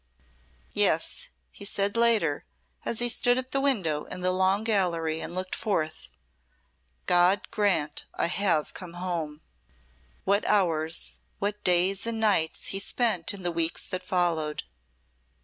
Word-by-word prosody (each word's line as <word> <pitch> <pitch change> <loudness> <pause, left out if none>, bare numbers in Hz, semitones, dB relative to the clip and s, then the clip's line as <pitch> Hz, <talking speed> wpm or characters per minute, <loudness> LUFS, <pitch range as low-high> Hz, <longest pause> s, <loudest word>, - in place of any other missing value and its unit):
"Yes," - - +1 0.2
he - - -11
said 200 0 0
later, 225 -11 +3 0.4
as 235 - -1
he 240 - +4
stood 245 +1 +3
at 260 0 -4
the 275 - 0
window 185 - 0
in 180 - -6
the 185 0 +2
Long 190 +3 +2
Gallery 170 -7 0
and 175 - -5
looked 185 0 -4
forth. 160 -7 -2 1.0
"God 180 +3 +4
grant 180 -8 0
I - - +2
have 170 -3 0
come 180 -2 -9
home." 170 -4 -4 0.8
What 200 +2 +2
hours, 165 -5 +1 0.2
what 205 +1 -3
days 185 +4 +3
and 230 -1 -2
nights 200 -8 +1
he 195 - -1
spent 205 -4 +1
in 195 -2 -9
the 175 - 0
weeks 165 0 0
that 185 - -3
followed. 170 -5 -1
185 Hz, 140 wpm, -27 LUFS, 165-205 Hz, 1.0 s, he